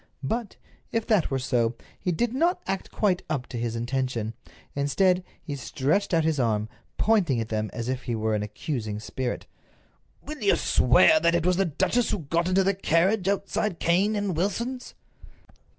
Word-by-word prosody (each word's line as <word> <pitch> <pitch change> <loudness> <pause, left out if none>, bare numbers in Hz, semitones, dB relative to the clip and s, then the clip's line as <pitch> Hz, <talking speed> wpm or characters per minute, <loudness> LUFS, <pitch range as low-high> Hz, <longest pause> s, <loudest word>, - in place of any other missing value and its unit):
But, 225 - -2 0.4
if 225 -1 -1
that 210 -7 +2
were 135 - 0
so, 120 -3 0 0.2
he 180 - -1
did 235 +8 0
not 340 +7 +2
act 195 0 -3
quite 190 -4 +1
up 140 -6 -1
to 125 - -5
his 115 -1 -2
intention. 120 -2 -2 0.4
Instead, 180 +7 +2 0.2
he 145 - -4
stretched 145 +8 0
out 165 -2 +3
his 155 -2 +1
arm, 110 -3 0 0.3
pointing 190 - +2
at 115 0 -3
them 110 -1 -1
as 115 -1 -5
if 130 0 -2
he 120 -2 -1
were 110 0 0
an 105 - 0
accusing 105 0 -4
spirit: 120 +4 -4 0.8
"Will 300 -2 -7
you 205 - +4
swear 125 +5 +5
that 170 +1 +3
it 170 -1 0
was 180 0 +3
the 195 - +3
duchess 225 - +1
who - - 0
got 170 +2 -1
into 190 +1 +3
the 195 +1 +2
carriage 190 +2 +1
outside 200 -1 -1
Cane 190 +7 +2
and 205 -4 -1
Wilson's?" 235 +9 -2
165 Hz, 180 wpm, -26 LUFS, 125-195 Hz, 0.8 s, swear